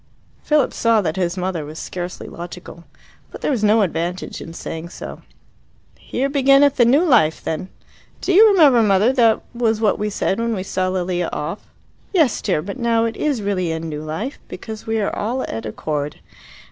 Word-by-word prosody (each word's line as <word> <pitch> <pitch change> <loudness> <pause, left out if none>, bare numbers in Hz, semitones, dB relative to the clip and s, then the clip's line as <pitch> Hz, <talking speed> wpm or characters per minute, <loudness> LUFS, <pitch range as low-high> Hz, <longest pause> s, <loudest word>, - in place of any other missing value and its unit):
Philip 300 -3 +2
saw 230 -1 +3
that 160 -4 -2
his 180 -1 -1
mother 180 -3 -2
was 155 +2 -9
scarcely 180 +1 -6
logical. 170 0 -9 0.4
But - - -11
there - - 0
was 235 -6 -1
no 215 +1 +4
advantage 175 0 -3
in 165 - -8
saying 165 0 -6
so. - - -9 0.8
"Here 265 +2 -2
beginneth 275 0 +4
the 240 - +5
New 275 +8 +4
Life, 220 - +3
then. 160 +4 -3 0.5
Do 385 - 0
you 430 +5 +8
remember, 295 -11 +6
mother, 210 +3 +3
that 230 -4 +3
was 225 -2 +1
what 215 -2 +1
we 210 0 -1
said 195 0 -1
when 230 -1 0
we 185 - -3
saw 185 -1 -1
Lilia 180 -2 -1
off?" 165 +7 -5 0.5
"Yes, 315 - +3
dear; 150 - 0
but 200 +7 -6
now 230 -1 +2
it 225 -1 -3
is 275 -6 -1
really 185 -4 -1
a 160 - -2
New 155 -2 -5
Life, 160 - -5
because 220 -1 -8
we 225 0 0
are 205 - -1
all 240 +5 -2
at 110 0 -5
accord. 145 +6 -3
205 Hz, 185 wpm, -20 LUFS, 170-240 Hz, 0.8 s, you